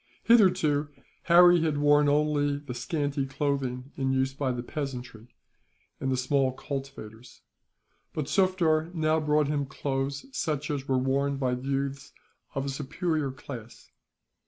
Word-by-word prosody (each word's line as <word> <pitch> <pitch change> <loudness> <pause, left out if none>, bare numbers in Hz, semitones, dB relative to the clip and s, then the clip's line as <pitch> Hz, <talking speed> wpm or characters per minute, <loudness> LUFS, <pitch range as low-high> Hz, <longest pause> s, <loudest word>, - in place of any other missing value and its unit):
Hitherto, 180 -10 +4 0.4
Harry 175 0 +7
had 155 -3 0
worn 145 0 +4
only 145 -1 +1
the 145 -3 -7
scanty 140 +2 -2
clothing 135 -2 -2
in 135 -1 -1
use 130 0 +1
by 135 -1 -1
the 120 -1 -4
peasantry, 125 -5 -6 0.7
and 135 - -1
the 130 - +1
small 130 0 +1
cultivators; 130 -5 -8 0.7
but 155 - -3
Sufder 170 -3 +2
now 160 0 +2
bought 150 -1 +2
him 145 -1 -1
clothes 135 0 -3
such 150 -2 -2
as 140 -2 -3
were 130 - +2
worn 135 +2 0
by 130 -2 0
youths 135 +2 -3 0.4
of 135 0 -1
a - - -2
superior 150 +2 -2
class. 125 -3 -10
140 Hz, 135 wpm, -28 LUFS, 135-150 Hz, 0.7 s, Harry